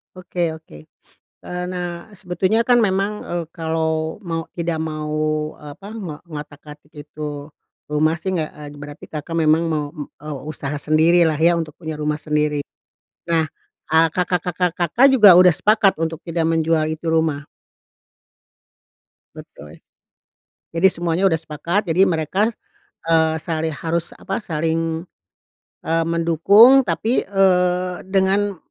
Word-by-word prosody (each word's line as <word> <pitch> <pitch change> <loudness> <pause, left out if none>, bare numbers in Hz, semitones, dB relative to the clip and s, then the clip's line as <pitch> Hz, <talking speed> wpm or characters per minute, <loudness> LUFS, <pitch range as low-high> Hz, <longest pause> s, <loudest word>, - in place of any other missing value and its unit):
Oke 175 -2 -2
oke, 160 - -12 0.6
eee, 180 0 -6
nah 175 -1 -5
sebetulnya 190 +2 -1
kan 245 - +5
memang, 200 +1 -1
eee, 175 -1 -4
kalau 160 -1 -2
mau 165 -5 -4
tidak 170 -1 -2
mau 155 -1 -2
apa 150 +7 -11
ngo 170 -9 -6
ngotak-atik 150 -1 -10
itu, 150 -1 -7 0.4
rumah 155 +2 +1
sih 190 +2 -2
gek 155 -3 -2
eee, 145 0 -11
berarti 145 0 -10
Kakak, 155 +2 -7
memang 160 +1 +3
mau 150 -2 -1
m 150 - -5 0.2
eee, 150 0 -6 0.2
usaha 145 -1 -5
sendirilah 160 +2 +3
ya 170 +2 +4
untuk 165 -2 -3
punya 160 -2 -5
rumah 150 0 -2
sendiri, 150 -1 0 0.7
nah, 160 -1 +2 0.5
eee, 165 +1 +6
kakak-kakak 180 0 -1
Kakak, 180 - +3
juga 200 -7 +8
udah 180 -3 +6
sepakat 210 -2 +3
untuk 165 -1 -3
tidak 165 0 -1
menjual 160 -1 +1
itu 160 +1 -6
rumah? 160 -3 0 1.9
Betul, 75 +2 -13 1.0
jadi 170 +3 +4
semuanya 175 +1 -1
udah 160 - +1
sepakat 170 +6 -2
jadi 170 +2 +3
mereka, 185 +5 +1 0.6
eee, 160 -1 +3
sali 160 0 -2
harus 165 +2 -3
apa 195 +3 -4
saling, 165 0 -2 0.8
eee, 165 +1 +1
mendukung 170 - +6
tapi, 220 +6 0
eee, 180 -2 +2
dengan, 195 +1 +1
165 Hz, 130 wpm, -20 LUFS, 155-180 Hz, 1.9 s, juga